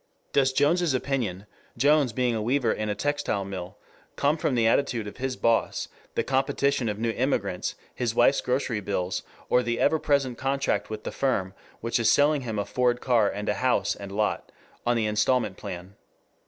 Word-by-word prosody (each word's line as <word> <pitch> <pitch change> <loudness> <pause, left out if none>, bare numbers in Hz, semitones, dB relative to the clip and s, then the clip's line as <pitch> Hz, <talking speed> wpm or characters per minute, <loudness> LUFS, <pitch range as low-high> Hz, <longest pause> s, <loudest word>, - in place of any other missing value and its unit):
Does 135 -1 +4
Jones's 150 +3 +2
opinion, 120 -8 -2 0.3
Jones 145 0 +4
being 125 +1 0
a 110 - -1
weaver 120 +1 +1
in 110 0 -2
a 105 - -1
textile 145 -9 -1
mill, 95 -2 -7 0.4
come 145 +2 +2
from 155 -4 -1
the 115 -2 +2
attitude 115 -1 +2
of 105 - -8
his 130 0 -2
boss, 115 -2 +1 0.3
the - - +1
competition 135 -2 +1
of 105 - -3
new 115 +1 0
immigrants, 105 -7 -1 0.2
his 120 -2 -2
wife's 130 +4 +4
grocery 125 -3 -1
bills, 95 -2 -2 0.3
or 125 - +4
the 120 -1 -2
ever 160 - +3
present 135 -5 +1
contract 135 +1 0
with 110 -1 -6
the - - -4
firm 95 -9 -1 0.3
which 115 +1 0
is 115 - +3
selling 145 0 +4
him 115 -4 -4
a 100 - -1
Ford 125 -1 +1
car 120 -6 +3
and 105 +2 -5
a - - +2
house 130 -1 +2
and 100 -1 -8
lot 105 +1 -1 0.4
on 120 0 +3
the 110 - +1
instalment 105 0 +1
plan? 90 +2 -8
120 Hz, 185 wpm, -26 LUFS, 105-135 Hz, 0.4 s, Does